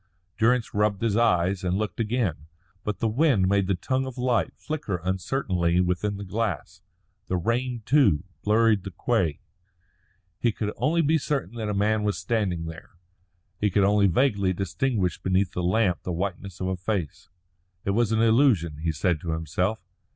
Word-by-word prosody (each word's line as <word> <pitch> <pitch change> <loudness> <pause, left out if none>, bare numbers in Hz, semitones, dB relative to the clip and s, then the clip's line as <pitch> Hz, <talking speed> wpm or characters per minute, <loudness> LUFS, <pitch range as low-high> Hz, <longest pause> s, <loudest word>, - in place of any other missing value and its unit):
Durrance 120 +1 +2
rubbed 105 0 +1
his 110 -3 +1
eyes 95 -4 +2
and 90 +1 0
looked 105 +1 -3
again. 105 - -1 0.4
But 105 -2 -2
the 115 - 0
wind 115 -5 +3
made 100 0 +2
the 95 - +1
tongue 130 +9 -1
of 130 -1 -8
light 125 -2 +1
flicker 120 - -3
uncertainly 90 -2 0
within 90 +3 0
the 100 - -6
glass; 95 - -3 0.5
the 95 - 0
rain, 120 +5 -1
too, 115 - +4 0.2
blurred 110 -2 +3
the 100 - -5
quay. 95 -6 -1 1.0
He 120 - +2
could 105 -1 -3
only 165 +3 +1
be 155 +2 +3
certain 140 -3 -2
that 110 -2 -3
a 105 - -1
man 105 +2 +2
was 105 -1 0
standing 95 -8 -1
there, 80 0 -9 0.7
he 105 - +2
could 100 +1 +2
only 100 0 +4
vaguely 100 -2 +2
distinguish 95 +1 -1
beneath 95 0 +1
the 90 - -3
lamp 90 0 +1
the 90 - -4
whiteness 95 +1 -4
of 95 - -2
a 95 - -2
face. 90 -5 -3 0.6
It 100 - +1
was 115 +1 +1
an 110 0 +2
illusion, 110 - +3
he 80 +2 -1
said 80 +1 0
to 85 -2 -2
himself. 90 +7 -1
100 Hz, 175 wpm, -26 LUFS, 90-115 Hz, 1.0 s, too